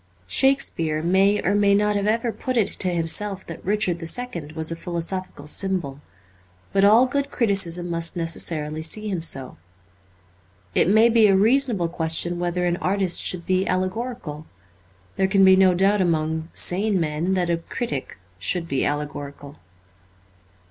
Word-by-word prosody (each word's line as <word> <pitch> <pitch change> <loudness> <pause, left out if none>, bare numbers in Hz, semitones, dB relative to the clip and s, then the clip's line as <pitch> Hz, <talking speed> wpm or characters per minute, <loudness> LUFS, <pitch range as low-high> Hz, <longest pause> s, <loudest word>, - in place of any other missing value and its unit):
Shakespeare 165 - +1
may 195 +4 +2
or 195 - +1
may 200 -1 +3
not 210 0 +1
have 200 0 -1
ever 230 +2 0
put 255 +2 -4
it 215 - +2
to 185 - +1
himself 180 +3 +1
that 165 - -9
Richard 195 -3 0
the 165 - -6
Second 170 -9 -4
was 160 +1 -2
a - - -3
philosophical 170 -1 -5
symbol; 155 -4 -1 0.7
but 195 0 +2
all 220 +5 +6
good 280 +2 -2
criticism 190 -8 0
must 170 +1 -1
necessarily 160 -2 -2
see 210 +7 -2
him 185 -4 -3
so. 135 -5 0 1.2
It - - +2
may 220 +3 +5
be 230 -2 +4
a 195 - +4
reasonable 225 -3 +2
question 165 +1 -1
whether 175 0 -1
an 175 0 0
artist 190 -1 +1
should 175 -2 -1
be 185 +1 0
allegorical. 185 -4 -4 0.7
There 190 - +2
can 195 0 +4
be 190 0 +7
no 185 -1 +4
doubt 195 +2 +2
among 160 -2 -1
sane 195 +2 0
men 165 +4 -1
that 175 -2 0
a 170 - +1
critic 165 - -5 0.2
should 175 - -1
be 135 -4 -1
allegorical. 145 -1 -5
180 Hz, 155 wpm, -22 LUFS, 165-205 Hz, 1.2 s, be